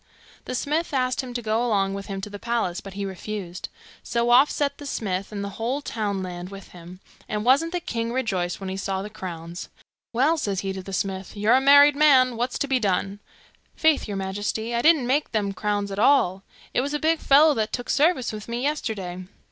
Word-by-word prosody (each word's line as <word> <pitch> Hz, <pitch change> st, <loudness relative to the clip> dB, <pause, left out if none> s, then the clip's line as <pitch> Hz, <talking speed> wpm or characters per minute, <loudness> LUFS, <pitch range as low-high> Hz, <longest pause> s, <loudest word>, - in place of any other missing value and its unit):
The 255 Hz, -, -4 dB
smith 300 Hz, +4 st, -1 dB
asked 255 Hz, 0 st, +1 dB
him 255 Hz, -2 st, -8 dB
to 240 Hz, -, -3 dB
go 220 Hz, +2 st, +1 dB
along 200 Hz, -5 st, +1 dB
with 200 Hz, 0 st, -6 dB
him 195 Hz, -1 st, -5 dB
to 210 Hz, -, -6 dB
the 205 Hz, -, -7 dB
palace, 230 Hz, -7 st, -1 dB
but 195 Hz, -, -10 dB
he 200 Hz, 0 st, -3 dB
refused; 190 Hz, -1 st, -6 dB, 0.3 s
so 235 Hz, 0 st, 0 dB
off 260 Hz, +4 st, +7 dB
set 280 Hz, -1 st, -1 dB
the 290 Hz, -, -7 dB
smith, 195 Hz, -6 st, -3 dB
and 200 Hz, -1 st, -4 dB
the 200 Hz, -, -4 dB
whole 245 Hz, +5 st, -1 dB
townland 190 Hz, -8 st, -4 dB
with 195 Hz, -1 st, -11 dB
him; 175 Hz, +1 st, -12 dB, 0.3 s
and 210 Hz, 0 st, -2 dB
wasn't 280 Hz, +7 st, +4 dB
the 355 Hz, -, -1 dB
king 230 Hz, -7 st, -3 dB
rejoiced 190 Hz, -9 st, -1 dB
when 195 Hz, -1 st, -5 dB
he 190 Hz, -, -4 dB
saw 195 Hz, 0 st, -2 dB
the 210 Hz, -, -8 dB
crowns! 175 Hz, -4 st, -7 dB, 0.4 s
'Well,' 285 Hz, +7 st, +2 dB
says 200 Hz, -7 st, -1 dB
he 195 Hz, -1 st, -3 dB
to 190 Hz, -, -6 dB
the 195 Hz, -, -9 dB
smith, 190 Hz, +1 st, -3 dB
'you're 210 Hz, +2 st, +3 dB
a 260 Hz, -, +5 dB
married 285 Hz, +1 st, +7 dB
man. 265 Hz, -4 st, +5 dB
What's 245 Hz, +2 st, -2 dB
to 285 Hz, -, -1 dB
be 265 Hz, -2 st, +2 dB
done?' 195 Hz, -1 st, -1 dB, 0.6 s
'Faith, 315 Hz, -2 st, +2 dB
your 205 Hz, -2 st, -4 dB
majesty, 205 Hz, +4 st, -3 dB
I 235 Hz, -, +1 dB
didn't 310 Hz, -4 st, +5 dB
make 275 Hz, +3 st, 0 dB
them 205 Hz, -2 st, 0 dB
crowns 205 Hz, +1 st, -2 dB
at 195 Hz, -, -4 dB
all. 210 Hz, -7 st, +3 dB, 0.3 s
It -, -, +2 dB
was 285 Hz, +3 st, -2 dB
a -, -, -1 dB
big 320 Hz, +1 st, +2 dB
fellow 295 Hz, +3 st, +6 dB
that 220 Hz, -4 st, -1 dB
took 245 Hz, -, -4 dB
service 295 Hz, -6 st, +2 dB
with 215 Hz, -1 st, -7 dB
me 235 Hz, +2 st, -3 dB
yesterday. 200 Hz, -11 st, -3 dB
220 Hz, 220 wpm, -24 LUFS, 195-265 Hz, 0.6 s, off